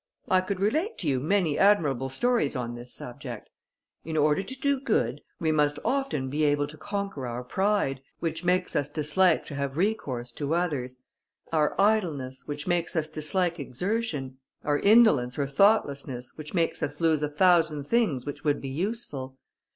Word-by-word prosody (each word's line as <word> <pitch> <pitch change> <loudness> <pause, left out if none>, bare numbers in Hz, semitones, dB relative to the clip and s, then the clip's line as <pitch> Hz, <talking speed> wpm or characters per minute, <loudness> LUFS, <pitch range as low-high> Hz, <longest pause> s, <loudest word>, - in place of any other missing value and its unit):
I 185 -1 +4
could 185 0 -3
relate 310 - 0
to 170 - -3
you 135 -3 +2
many 165 +1 +1
admirable 145 -10 +3
stories 235 - +1
on 120 -2 -3
this 120 +1 -9
subject. 120 - -8 0.5
In 160 0 -3
order 150 +3 +3
to 260 +6 -8
do 280 -1 +1
good, 145 - 0 0.2
we 160 -1 +1
must 150 -1 +2
often 270 - 0
be 150 +4 -1
able 145 -1 +2
to 155 - -11
conquer 200 -7 -4
our 120 +1 -4
pride, 190 -4 0 0.2
which 165 0 -3
makes 180 +1 +1
us 145 0 0
dislike 160 +4 +2
to - - -8
have 140 0 -3
recourse 145 - -1
to 145 +5 -2
others; 130 -8 -2 0.5
our 150 -2 +1
idleness, 165 -12 +1
which 145 -1 -4
makes 175 -1 0
us 160 -2 +1
dislike 165 +3 -1
exertion; 145 - -3 0.2
our 145 -1 +1
indolence 200 - +5
or 140 - +1
thoughtlessness, 140 - +1
which 155 +3 -8
makes 165 -2 0
us 145 0 -3
lose 160 -3 +2
a 150 - 0
thousand 160 -2 +3
things 150 - +1
which 145 - -6
would 145 -1 +1
be 135 - -6
useful. 140 - -4
155 Hz, 170 wpm, -27 LUFS, 135-190 Hz, 0.5 s, indolence